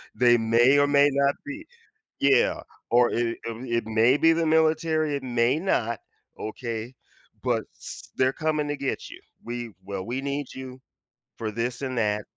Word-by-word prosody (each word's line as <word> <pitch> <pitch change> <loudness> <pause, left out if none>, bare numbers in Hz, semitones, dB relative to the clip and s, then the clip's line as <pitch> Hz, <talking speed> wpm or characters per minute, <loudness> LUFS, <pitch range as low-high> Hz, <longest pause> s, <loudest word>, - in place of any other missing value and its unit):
They 120 -1 +5
may 120 +5 +4
or 145 - +4
may 145 0 +5
not 140 0 +2
be 295 +3 -7 0.5
yeah, 140 -2 +3 0.3
or 120 0 +5
it 115 0 -1
it 115 0 -3
may 115 +5 +4
be 165 +2 +5
the 165 0 0
military, 155 -1 +2
it 140 - -4
may 125 +3 +1
not, 120 - 0 0.4
okay, 115 +1 -5 0.5
but - - +1
s - - -10
they're 130 0 +3
coming 155 -1 -1
to 145 - -1
get 135 - -3
you, - - -12 0.2
"We 120 -1 -5
well, 95 -1 -5
we 125 +3 -3
need 140 0 -3
you 130 0 -9 0.6
for 110 -2 -3
this 120 +3 -3
and 130 -2 -3
that, 105 -2 +1
130 Hz, 165 wpm, -26 LUFS, 115-145 Hz, 0.6 s, They